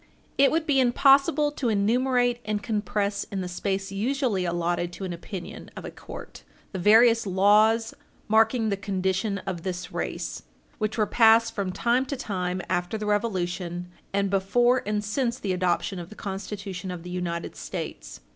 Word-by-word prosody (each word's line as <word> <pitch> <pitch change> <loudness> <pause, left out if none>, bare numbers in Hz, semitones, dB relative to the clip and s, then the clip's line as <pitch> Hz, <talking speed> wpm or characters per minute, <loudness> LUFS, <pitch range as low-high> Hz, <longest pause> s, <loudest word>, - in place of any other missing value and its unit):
It 275 0 +5
would 320 0 0
be 285 -3 +3
impossible 275 +3 +4
to 265 -4 -2
enumerate 245 +3 +2
and 210 -1 -2
compress 205 -2 -1
in 195 -1 -4
the 180 - -3
space 195 +2 -3
usually 225 -2 0
allotted 175 0 -1
to 195 - -7
an 185 -2 -3
opinion 175 +1 -8
of - - -7
a - - -6
court - - -10 0.3
the 190 - -4
various 225 +3 +5
laws, 210 +4 +4 0.3
marking 225 +1 +3
the 200 - 0
condition 195 +1 -1
of 180 -3 -4
this 180 0 -5
race - - -4 0.4
which 215 0 -1
were 215 - +3
passed 225 +1 +5
from 195 -3 -2
time 245 +6 +1
to 280 - -2
time 185 -5 -3
after 175 +5 -1
the 215 - -4
Revolution 180 -4 -2 0.2
and 200 0 0
before 240 +6 +3
and 210 0 0
since 235 +3 -1
the 195 -6 -2
adoption 180 +1 0
of 170 0 -8
the 215 - -11
Constitution 195 -1 -5
of 180 -2 -6
the 180 - -8
United 175 -2 -3
States. - - -7
205 Hz, 165 wpm, -26 LUFS, 185-230 Hz, 0.4 s, It